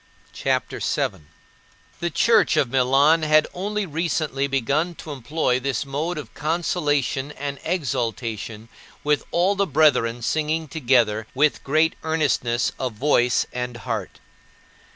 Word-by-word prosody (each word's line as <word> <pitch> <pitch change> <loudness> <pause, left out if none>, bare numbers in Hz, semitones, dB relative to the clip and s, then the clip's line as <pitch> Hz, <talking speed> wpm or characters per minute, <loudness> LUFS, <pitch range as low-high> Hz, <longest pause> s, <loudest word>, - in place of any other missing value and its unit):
CHAPTER - - -1
VII - - -1
15. 75 - -23 0.7
The 170 0 -1
church 215 +1 +3
of 135 -5 +2
Milan 135 +5 +4
had 155 0 +4
only 205 +3 -2
recently 155 -4 -1
begun 140 +6 0
to 155 - -9
employ 130 -1 -1
this 135 0 -2
mode 150 +5 -3
of 140 -7 -8
consolation 145 -4 -1
and 140 -1 -5
exaltation 115 - -3 0.4
with 150 0 +1
all 180 +4 +2
the 200 0 +1
brethren 125 -6 +2
singing 155 +3 0
together 120 -7 +1
with 150 +2 +2
great 155 +3 +2
earnestness 140 -7 0
of 130 -3 -2
voice 125 0 +2
and 125 -1 -4
heart. 115 -5 -5
145 Hz, 130 wpm, -23 LUFS, 125-160 Hz, 0.7 s, Milan